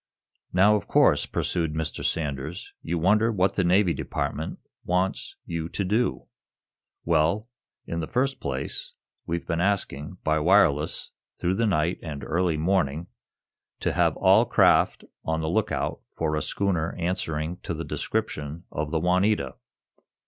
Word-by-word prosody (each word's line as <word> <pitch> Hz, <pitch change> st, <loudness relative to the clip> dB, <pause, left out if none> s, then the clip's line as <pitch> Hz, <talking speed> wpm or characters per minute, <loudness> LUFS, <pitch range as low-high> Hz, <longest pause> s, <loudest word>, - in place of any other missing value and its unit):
"Now, 100 Hz, +4 st, +5 dB
of 105 Hz, -, -2 dB
course," -, -, +4 dB
pursued 80 Hz, -3 st, -1 dB
Mr. 80 Hz, -1 st, -3 dB
Sanders, 75 Hz, +2 st, -3 dB
"you 85 Hz, -, -2 dB
wonder 105 Hz, +7 st, +3 dB
what 95 Hz, -2 st, +2 dB
the 95 Hz, -, +1 dB
Navy 90 Hz, 0 st, +4 dB
Department 80 Hz, 0 st, -3 dB, 0.3 s
wants 90 Hz, +2 st, -1 dB
you 85 Hz, -1 st, -4 dB
to 100 Hz, -, -2 dB
do. 110 Hz, +6 st, 0 dB, 0.8 s
Well, 85 Hz, +7 st, +2 dB, 0.4 s
in 85 Hz, -, -3 dB
the 80 Hz, -, -3 dB
first 135 Hz, +3 st, 0 dB
place, 70 Hz, 0 st, -3 dB, 0.3 s
we've 85 Hz, 0 st, -2 dB
been 85 Hz, 0 st, -1 dB
asking, 90 Hz, -4 st, -1 dB
by 80 Hz, 0 st, +2 dB
wireless, 80 Hz, -3 st, +3 dB, 0.3 s
through 90 Hz, +1 st, +1 dB
the 115 Hz, +4 st, +1 dB
night 85 Hz, -2 st, +1 dB
and 75 Hz, -4 st, -6 dB
early 85 Hz, 0 st, 0 dB
morning, 80 Hz, -1 st, 0 dB, 0.7 s
to -, -, 0 dB
have -, -, +2 dB
all -, -, +6 dB
craft -, -, +4 dB, 0.2 s
on 80 Hz, 0 st, -1 dB
the 80 Hz, -, -2 dB
lookout 105 Hz, +4 st, -1 dB
for 80 Hz, -2 st, 0 dB
a 75 Hz, -, 0 dB
schooner 85 Hz, -4 st, -1 dB
answering 85 Hz, -2 st, -2 dB
to 85 Hz, -, -5 dB
the 80 Hz, -, -5 dB
description 75 Hz, +3 st, -3 dB
of 75 Hz, 0 st, -3 dB
the 80 Hz, -, 0 dB
'Juanita'." 90 Hz, -3 st, +2 dB
85 Hz, 145 wpm, -26 LUFS, 80-95 Hz, 0.8 s, all